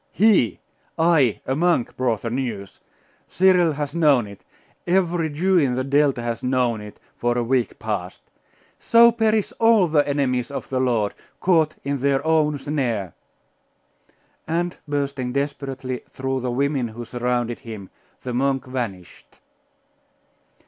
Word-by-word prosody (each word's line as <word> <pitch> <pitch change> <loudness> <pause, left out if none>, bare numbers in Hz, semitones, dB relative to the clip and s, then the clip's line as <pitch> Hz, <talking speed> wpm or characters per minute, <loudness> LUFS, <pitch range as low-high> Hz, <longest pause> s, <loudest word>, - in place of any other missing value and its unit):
He! 200 - +3 0.4
I, 160 -8 +3
a 130 - -1
monk, 170 -5 +1
brought 120 -5 -1
the 115 - -3
news! 115 -6 -4 0.5
Cyril 180 -3 +4
has 145 -1 -4
known 150 -8 +3
it 100 -1 -13 0.4
every 175 -3 +1
Jew 180 +5 +2
in 130 -5 +1
the 130 - -1
Delta 140 -2 +2
has 115 0 -3
known 125 -4 0
it, 105 0 -11 0.2
for 120 0 0
a 120 - +1
week 125 0 0
past! 100 -4 -5 0.6
So 235 0 +6
perish 220 -2 0
all 225 -5 +5
the 150 -2 +2
enemies 130 -4 0
of 140 - -6
the 130 - -1
Lord, 115 -5 +1 0.3
caught 160 -4 +2
in 140 0 -2
their 140 +2 +1
own 155 -2 +2
snare!' 120 - -2 1.3
And 170 +2 -1
bursting 140 -3 -2
desperately 135 -2 -3
through 135 0 -3
the 125 0 -3
women 135 0 0
who 115 +2 -8
surrounded 120 0 -2
him, 110 -5 -9 0.3
the 125 - -4
monk 135 +1 0
vanished. 115 -9 -7
135 Hz, 140 wpm, -22 LUFS, 120-155 Hz, 1.3 s, So